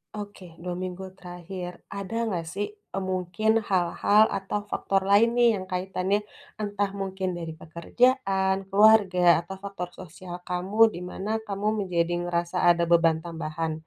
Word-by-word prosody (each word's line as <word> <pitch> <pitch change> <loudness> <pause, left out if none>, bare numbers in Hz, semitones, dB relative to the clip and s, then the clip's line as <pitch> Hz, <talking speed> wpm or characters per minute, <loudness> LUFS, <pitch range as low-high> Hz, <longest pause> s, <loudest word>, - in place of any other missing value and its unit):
Oke, 205 -2 -8 0.2
2 180 0 -3
minggu 185 +1 -5
terakhir. 180 0 -7 0.2
Ada 200 +1 -6
nggak 180 -6 -2
sih, 205 +2 -2 0.2
eee, - - -2
mungkin 185 +4 0 0.2
hal-hal 190 +3 +4
atau 195 +2 -3
faktor 195 0 0
lain 215 +3 +6
nih, 240 0 +6
yang 190 - -4
kaitannya 185 +2 0 0.4
entah 205 -1 -1
mungkin 190 -1 -3
dari 165 -1 -5
pekerjaan, 190 - +1
keluarga, 195 -4 +5
atau 175 +3 -7
faktor 195 -3 -5
sosial 180 0 -9
kamu, 180 +4 -3 0.2
di - - -5
mana 195 +3 -6 0.2
kamu 200 +1 -2 0.2
menjadi 170 -1 0 0.2
ngerasa 175 +1 -1
ada 170 0 +4
beban 165 -1 +5
tambahan? 165 -1 -4
185 Hz, 145 wpm, -26 LUFS, 175-200 Hz, 0.4 s, lain